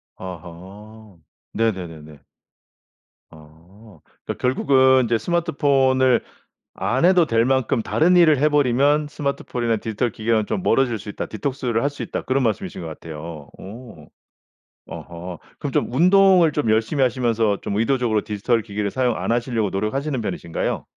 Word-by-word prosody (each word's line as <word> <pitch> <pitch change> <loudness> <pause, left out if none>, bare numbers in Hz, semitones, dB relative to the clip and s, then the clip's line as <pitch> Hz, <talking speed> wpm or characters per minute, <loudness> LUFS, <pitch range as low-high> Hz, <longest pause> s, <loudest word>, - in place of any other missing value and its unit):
아하. 95 +4 -11 0.3
네네네네. 80 -9 -4 1.1
아. 80 +5 -18 0.3
그러니까 - - -6
결국은 130 0 +3
"이제 115 0 +1
스마트폰을 135 -5 +2 0.5
안 130 +5 -1
해도 180 -2 +5
될 115 -3 +2
만큼 130 -2 +1
다른 180 +4 +2
일을 160 -5 +5
해 150 +3 +3
버리면 145 +1 +2
스마트폰이나 125 -5 -2
디지털 110 +2 -2
기계는 110 0 0
좀 185 - -3
멀어질 125 - +1
수 105 - -11
있다. - - -5
디톡스를 120 0 -2
할 140 - +1
수 145 - -8
있다." - - -4
그런 135 +1 0
말씀이신 155 - -2
것 - - -6
같아요. 80 -1 -9
어. 100 -6 -11 0.8
아하. 85 0 -8 0.2
그럼 - - -4
좀 - - -1
운동을 180 +2 +5
좀 145 -6 -1
열심히 110 +6 +1
하시면서 115 -4 0
좀 100 - -3
의도적으로 115 -1 +1
디지털 110 +3 0
기계를 105 -1 -4
사용 125 -1 0
안 - - -2
하시려고 120 -3 0
노력하시는 130 +7 -2
편이신가요? 85 -5 -3
115 Hz, 335 characters per minute, -21 LUFS, 105-135 Hz, 1.1 s, 해도